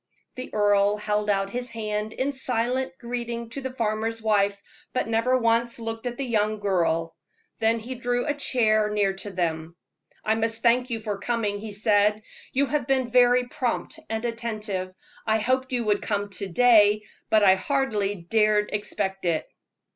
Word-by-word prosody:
The 255 - -7
earl 205 0 +3
held 210 0 -1
out 195 -1 +1
his 245 +2 -4
hand 215 -1 -3
in 270 +2 -1
silent 260 0 -1
greeting 235 -1 -4
to 275 +4 -5
the 260 - -3
farmer's 225 -2 -1
wife, 205 -2 +1 0.3
but 255 - -1
never 230 +3 +2
once 230 0 +1
looked 225 +1 -5
at 240 0 -4
the 275 - -2
young 215 -3 0
girl. 165 -4 0 0.4
Then 225 +1 +3
he 235 +3 -6
drew 245 0 -1
a 295 - +1
chair 215 -7 +2
near 205 -2 +1
to 205 - -4
them. 170 -3 -3 0.5
"I 220 - +3
must 225 0 -1
thank 245 +2 +3
you 225 -2 -3
for 210 -2 -4
coming," 210 -2 -1
he 215 0 -7
said. 210 0 +2 0.3
"You 275 +2 +2
have 280 -1 -1
been 260 -3 +1
very 245 0 +5
prompt 255 +5 -3
and 225 +1 -2
attentive. 215 -5 -3 0.4
I 220 0 +3
hoped 260 +4 0
you 245 -2 0
would 205 -1 +2
come 205 -1 -2
to 200 0 -3
day, 210 0 +5 0.3
but 215 -1 +4
I 190 -2 +7
hardly 210 -3 0
dared 210 +3 +1
expect 195 -2 -2
it." 165 -2 0
220 Hz, 170 wpm, -25 LUFS, 205-245 Hz, 0.5 s, I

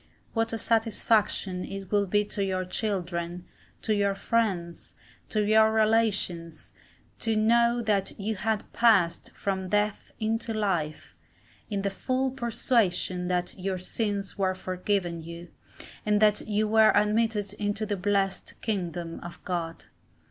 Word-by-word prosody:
What 225 -1 0
a 225 - -1
satisfaction 220 -4 +1
it 195 0 -7
would 200 -2 +2
be 205 +2 +3
to 200 -1 -2
your 185 -1 -1
children, 180 -3 -3 0.4
to 215 - +1
your 200 -1 +1
friends, 195 -7 -1 0.3
to 215 -1 +1
your 220 +1 +5
relations, 215 -7 +1 0.5
to 225 -1 0
know 235 +2 +3
that 205 -3 0
you 210 +3 -1
had 215 +1 -2
passed 200 -8 +3
from 190 -2 -2
death 210 +1 0
into 225 +1 -1
life, 175 -8 -2 0.5
in 200 -2 -2
the 200 - 0
full 260 +6 -1
persuasion 225 -7 0
that 180 -1 0
your 190 0 -2
sins 200 +1 -3
were 190 -1 +1
forgiven 185 -2 -1
you, 170 +1 -9 0.5
and 210 -1 +2
that 210 -1 +3
you 215 0 +1
were 220 0 +6
admitted 210 0 +2
into 210 +1 -1
the 205 -1 -1
blessed 195 0 -1
kingdom 175 -6 -3
of 175 0 -10
God. 170 -3 -3
205 Hz, 135 wpm, -27 LUFS, 185-220 Hz, 0.5 s, were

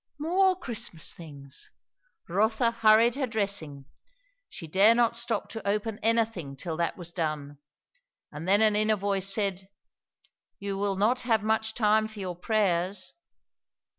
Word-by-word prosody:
More 370 +5 +2
Christmas 220 - -3
things! 140 -4 -8 0.6
Rotha 220 +6 +2
hurried 225 +1 +5
her 270 0 -2
dressing; 200 - -2 0.6
she - - -9
dared 200 +8 +5
not 235 -1 +3
stop 235 -2 -1
to 225 -2 -7
open 210 +1 -1
anything 220 -10 0
till 160 +4 -5
that 170 0 -1
was 170 -2 -6
done; 150 -4 -3 0.7
and 150 +4 -7
then 200 +3 +4
an 215 -1 +4
inner 215 +1 +3
voice 195 -1 -1
said, 195 -2 -1 0.9
You 200 0 -4
will 200 -1 0
not 220 +6 +2
have 225 -4 +1
much 220 0 0
time 215 -1 +3
for 220 0 -14
your 185 -3 -4
prayers. 185 -1 0
205 Hz, 140 wpm, -28 LUFS, 180-225 Hz, 0.9 s, hurried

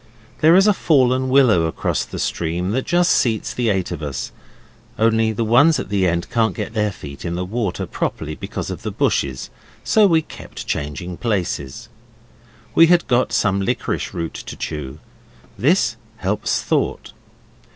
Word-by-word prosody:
There 160 +2 +6
is 190 +1 +6
a 210 - +5
fallen 130 -7 +2
willow 125 -11 +4
across 80 - -2
the - - -8
stream 85 +3 -2
that 130 +4 -2
just 175 +1 +3
seats 110 -4 +1
the 120 -2 0
eight 95 -3 -1
of 85 -3 -5
us, 70 -2 -4 0.7
only 110 0 +2
the 110 +2 -2
ones 140 +7 +4
at - - -5
the 100 -2 +1
end 85 0 -1
can't 115 -2 +1
get 110 0 -5
their 105 -2 0
feet 70 -6 -10
into 85 -1 -3
the 90 +1 -2
water 105 -1 -2
properly 75 0 -3
because - - -5
of - - -6
the - - -4
bushes, 65 -2 -1 0.3
so 215 -2 +4
we 165 -3 +3
keep - - -12
changing 75 +5 -4
places. 90 - -3 0.9
We 165 - +7
had 175 0 +4
got 125 0 +1
some 100 -2 +1
liquorice 95 - -2
root 85 -1 -4
to - - -8
chew. 75 -2 -5 0.6
This 125 - +2 0.2
helps 105 +2 -1
thought. - - -1
110 Hz, 165 wpm, -20 LUFS, 85-130 Hz, 0.9 s, We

